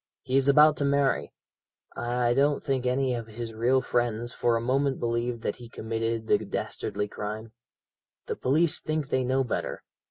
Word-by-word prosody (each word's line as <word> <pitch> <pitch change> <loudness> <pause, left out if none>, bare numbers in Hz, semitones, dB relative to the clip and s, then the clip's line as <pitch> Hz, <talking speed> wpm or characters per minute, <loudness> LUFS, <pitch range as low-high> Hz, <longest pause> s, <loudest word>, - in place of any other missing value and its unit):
He 130 0 -2
is 135 0 +4
about 150 +2 +6
to - - -1
marry. 140 -1 +1 0.6
I 120 0 0
don't 140 +3 +2
think 130 -2 0
any 130 0 +1
of 115 -2 -4
his 115 +1 -6
real 125 +4 +2
friends 120 -1 -1
for 120 -1 +1
a - - +1
moment 135 +3 0
believed 120 0 -1
that - - -2
he 120 -1 -11
committed 115 0 -3
the - - +3
dastardly 105 - -3
crime. 110 +2 -6 0.7
The - - -3
police 150 +4 +2
think 155 -2 -2
they 130 -2 +1
know 130 +2 +1
better. 125 - -3
125 Hz, 170 wpm, -27 LUFS, 115-135 Hz, 0.7 s, about